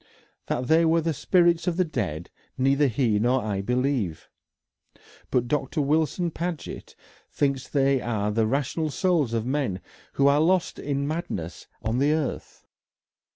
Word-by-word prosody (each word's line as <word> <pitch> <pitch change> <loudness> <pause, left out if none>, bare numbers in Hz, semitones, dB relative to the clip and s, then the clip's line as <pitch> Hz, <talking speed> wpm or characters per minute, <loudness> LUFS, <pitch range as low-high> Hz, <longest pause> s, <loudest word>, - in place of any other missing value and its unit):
That 125 - -1
they 160 +4 +4
were 165 0 +3
the 165 0 -1
spirits 170 +3 +2
of 175 -1 0
the 185 - +4
dead 85 - -4 0.3
neither 140 +2 +3
he 115 -3 +1
nor 125 +4 +2
I 100 -2 -2
believe. 125 - -1 1.0
But 125 -1 +1
Doctor 145 +3 -1
Wilson 160 +4 +1
Paget 170 -1 -5 0.4
thinks 140 -2 -1
they 135 -2 +2
are 105 -3 -1
the 110 +1 +1
rational 145 +5 -1
souls 160 - +1
of 115 -1 -1
men 130 -8 -1 0.3
who 140 - +2
are 145 +1 +4
lost 180 +2 +1
in 140 -1 -2
madness 100 - -5 0.2
on 110 +3 0
the 145 +2 +3
earth. 155 -3 -4
140 Hz, 150 wpm, -25 LUFS, 120-160 Hz, 1.0 s, they